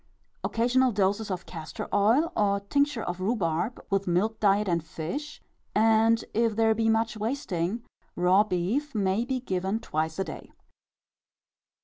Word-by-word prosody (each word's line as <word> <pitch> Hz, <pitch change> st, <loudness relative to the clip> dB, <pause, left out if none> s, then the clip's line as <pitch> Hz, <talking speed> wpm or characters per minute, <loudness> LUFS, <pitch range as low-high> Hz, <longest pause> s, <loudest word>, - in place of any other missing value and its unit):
Occasional 250 Hz, +2 st, +2 dB
doses 200 Hz, +2 st, 0 dB
of 185 Hz, -1 st, -4 dB
castor 165 Hz, +6 st, -7 dB
oil 230 Hz, +11 st, +3 dB
or 200 Hz, -1 st, +2 dB
tincture 280 Hz, +3 st, 0 dB
of 175 Hz, +1 st, -4 dB
rhubarb, 190 Hz, 0 st, -1 dB
with 195 Hz, -1 st, 0 dB
milk 200 Hz, +6 st, +1 dB
diet 205 Hz, 0 st, +3 dB
and 170 Hz, -3 st, 0 dB
fish, 175 Hz, -, -6 dB, 0.3 s
and, 225 Hz, +1 st, +4 dB
if 225 Hz, -1 st, +1 dB
there 225 Hz, 0 st, +3 dB
be 225 Hz, 0 st, +1 dB
much 225 Hz, 0 st, +1 dB
wasting, 215 Hz, -3 st, -2 dB, 0.3 s
raw 185 Hz, +3 st, +4 dB
beef 215 Hz, +9 st, -2 dB
may 200 Hz, +2 st, +1 dB
be 260 Hz, 0 st, -1 dB
given 190 Hz, -2 st, -2 dB
twice 160 Hz, -5 st, -2 dB
a 195 Hz, -, 0 dB
day. -, -, -9 dB
210 Hz, 140 wpm, -27 LUFS, 185-230 Hz, 0.3 s, and